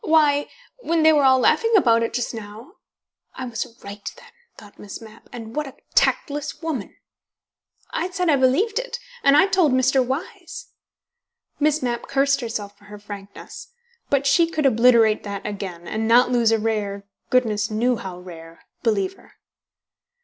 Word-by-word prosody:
"Why, 295 -3 +3 0.3
when 335 -8 0
they 315 0 +6
were 290 -2 +3
all 260 0 +6
laughing 455 - +2
about 230 - +4
it 230 - -1
just 245 0 -3
now" 225 - -10 0.6
("I 260 - -5
was 230 -3 -4 0.2
right, 200 0 -7
then," - - -16 0.3
thought 205 -1 -16
Miss 200 - -8
Mapp, 220 0 -15
"and 225 -2 -9
what 300 -1 -2
a 270 - -11 0.2
tactless 295 - 0
woman!"), 315 -10 -5 1.0
"I 350 +3 -2
said 360 -1 -2
I 305 - +4
believed 285 - +2
it. - - -5 0.3
And 280 +1 +5
I 380 - +6
told 365 -8 +2
Mr. 260 +1 +3
Wyse." 355 - -6 0.9
Miss 305 -1 +1
Mapp 240 -1 -3
cursed 275 0 +1
herself 210 -4 -5
for 205 - -20
her 210 0 -11
frankness. 205 - -11 0.4
But 280 0 +1
she 335 +4 +4
could 310 -3 -2
obliterate 230 -3 +4
that 200 -1 -6
again, 190 -5 -6
and 220 0 -2
not 245 +2 +5
lose 235 -2 +3
a 225 - +3
rare 210 -2 -2 0.3
(goodness 220 -4 +1
knew 235 +3 +1
how 190 -3 -7
rare!) 165 -2 -12 0.2
believer. 205 -5 -2
245 Hz, 165 wpm, -22 LUFS, 210-295 Hz, 1.0 s, they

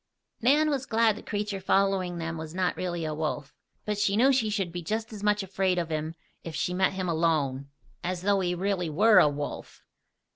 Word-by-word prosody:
Nan 295 +6 +4
was 270 -2 -2
glad 225 -1 +3
the - - -9
creature 205 -2 -3
following 190 -2 +1
them 165 0 -4
was 160 +1 -7
not 185 -1 0
really 175 -2 -3
a 155 - -2
wolf; 150 -2 -3 0.3
but 210 -1 -2
she 205 0 +2
knew 265 +4 +5
she 230 -5 +1
should 195 -5 -1
be 175 +1 -5
just 220 +6 -3
as 210 - -8
much 210 0 +2
afraid 190 -1 0
of 170 -2 -1
him 155 +1 -3 0.3
if 165 -2 -7
she 180 - -1
met 190 +1 +2
him 185 -1 -3
alone, 155 -5 0 0.3
as 180 0 -3
though 200 0 +3
he 180 -1 0
really 185 -2 -1
were 210 +8 +5
a 150 - +5
wolf. 145 0 -6
185 Hz, 210 wpm, -27 LUFS, 165-210 Hz, 0.3 s, knew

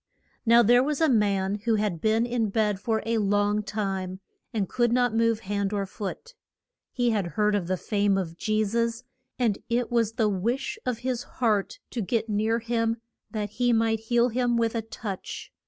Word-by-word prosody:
Now 235 +1 +7
there 245 +3 +6
was 290 +2 -1
a 320 - +4
man 205 -5 +2
who 230 -2 +3
had 205 -6 -1
been 220 +2 +2
in 235 -3 0
bed 210 -2 +1
for 220 0 -1
a 230 0 +1
long 205 +1 +2
time, 195 -3 -3 0.3
and 205 -4 -1
could 240 +3 +1
not 245 -1 +2
move 230 -1 +2
hand 200 0 -2
or 200 -1 0
foot. 210 - -7 0.6
He 245 -2 +1
had 205 -5 0
heard 210 0 +3
of 195 -4 0
the 185 0 0
fame 200 0 +1
of 170 -4 -3
Je 215 +4 0
sus, 230 +2 -1 0.3
and 230 -6 +1
it 240 +1 0
was 230 -2 +2
the 225 -2 +2
wish 210 +6 -1
of 250 -3 0
his 250 -2 0
heart 215 -7 -1
to 235 - -2
get 225 +3 -1
near 215 +2 +1
him 230 -1 0 0.3
that 210 -2 -3
he 245 +2 +1
might 225 -1 +2
heal 235 +2 +2
him 240 0 +1
with 230 -1 +1
a 230 - -1
touch. 215 -3 -7
220 Hz, 190 wpm, -26 LUFS, 205-235 Hz, 0.6 s, Now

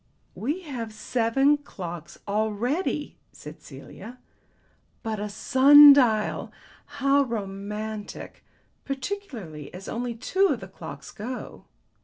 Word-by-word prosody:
"We 295 - -3
have 250 -9 -6
seven 250 +6 +2
clocks 175 - -8
already," 220 - -1
said - - -12
Celia. 245 +3 -11 0.9
"But 220 -2 -3
a 210 0 -3
sun 280 +7 +8
dial! 225 -6 +1 0.4
How 280 -1 +2
romantic. 210 -2 -5 0.4
Particularly 260 - -6
as 190 +1 -9
only 240 0 -3
two 375 - +2
of - - -1
the - - -9
clocks - - -10
go. 245 +4 -7
235 Hz, 105 wpm, -26 LUFS, 210-280 Hz, 0.9 s, sun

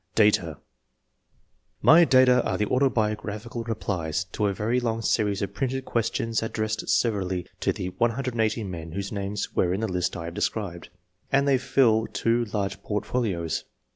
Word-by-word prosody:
DATA. 95 -8 +3 1.3
My 170 +2 +8
data 130 -3 +5
are - - -1
the 105 - +1
autobiographical 110 -2 -1
replies 95 -7 -2
to 105 +1 0
a - - +1
very 115 +6 0
long 115 -2 -2
series 105 -3 +1
of 100 - -4
printed 130 -1 -2
questions 115 0 -1
ad 115 - -4
dressed 110 0 -2
severally 95 -6 +1
to - - +1
the 90 - -4
180 115 +2 0
men 85 -4 -6
whose 100 +1 -4
names 100 0 -4
were 90 0 +2
in 100 - -3
the 110 - 0
list 90 -2 -1
I 85 - -6
have 85 - -6
described, 90 -4 -3 0.4
and 140 +1 +3
they 135 -2 +4
fill 115 -4 +3
two 115 +1 0
large 100 -2 -3
portfolios. 105 -6 -2
110 Hz, 160 wpm, -26 LUFS, 95-120 Hz, 1.3 s, My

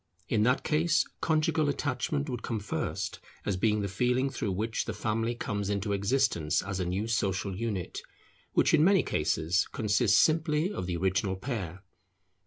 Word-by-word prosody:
In 105 - +1
that 125 +5 +2
case 160 +1 +2 0.2
conjugal 155 -1 +2
attachment 140 +1 -1
would 125 -4 -4
come 115 - -2
first, 105 - -3 0.3
as 100 - 0
being 105 +2 +1
the 100 - -1
feeling 125 +7 +1
through 100 -6 -2
which 110 +4 -2
the 110 - -4
family 115 +2 -1
comes 100 -3 -3
into 100 0 -1
existence 100 - +1
as 100 -1 -4
a 90 - -1
new 95 +4 -1
social 100 -3 -1
unit, 100 -4 -3 0.5
which - - +3
in 155 -1 +6
many 195 +2 +5
cases 80 +4 +1
consists 105 -3 +2
simply 160 - +2
of 90 - -4
the 90 -2 -1
original 95 +2 0
pair. 95 -4 -5
105 Hz, 165 wpm, -29 LUFS, 95-135 Hz, 0.5 s, in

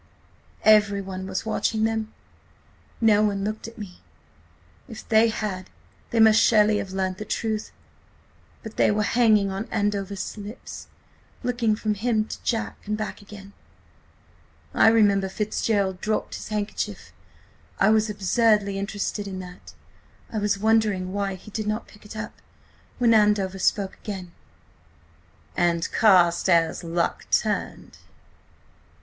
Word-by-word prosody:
"Everyone 200 -3 +3
was 190 +2 -3
watching 220 0 0
them... 220 -1 -1 0.9
no 215 -2 +4
one 200 -2 0
looked 215 +1 -4
at 230 - -12
me. 200 -5 -9 0.9
If 225 - -10
they 220 +1 +5
had 200 -4 -4 0.4
they 230 - 0
must 220 0 +7
surely 215 -2 +4
have 195 - -5
learnt 190 -1 -2
the - - -4
truth; 215 0 -3 0.9
but 220 -2 -9
they - - +4
were 210 0 +1
hanging 215 -3 +3
on 195 +4 -5
Andover's 205 -1 -2
lips, 210 +4 -9 0.6
looking 240 -3 +1
from 215 0 -1
him 215 +1 0
to - - -7
Jack 225 -2 -2
and 210 0 -1
back 215 0 -5
again.... 200 -1 -12 1.2
I - - +5
remember 205 -4 +4
Fitzgerald 200 -2 -1
dropped 215 0 -2
his - - -7
handkerchief–I 100 - -4
was 220 0 +3
absurdly 205 0 +2
interested 200 0 -3
in 190 -1 -6
that. 180 0 -12 0.6
I 220 - -1
was 205 -1 0
wondering 210 -3 +1
why 200 -1 -2
he 200 +3 -13
did 215 0 -4
not 215 +2 -2
pick 210 - -18
it 210 - -10
up, 215 -1 -7 0.6
when 235 -2 +4
Andover 205 -3 +2
spoke 195 +1 0
again.... 190 -4 -6 1.2
'And 170 -1 +1
Carstares' 175 -5 +3
luck 170 0 -2
turned. - - -1
210 Hz, 130 wpm, -24 LUFS, 190-220 Hz, 1.2 s, must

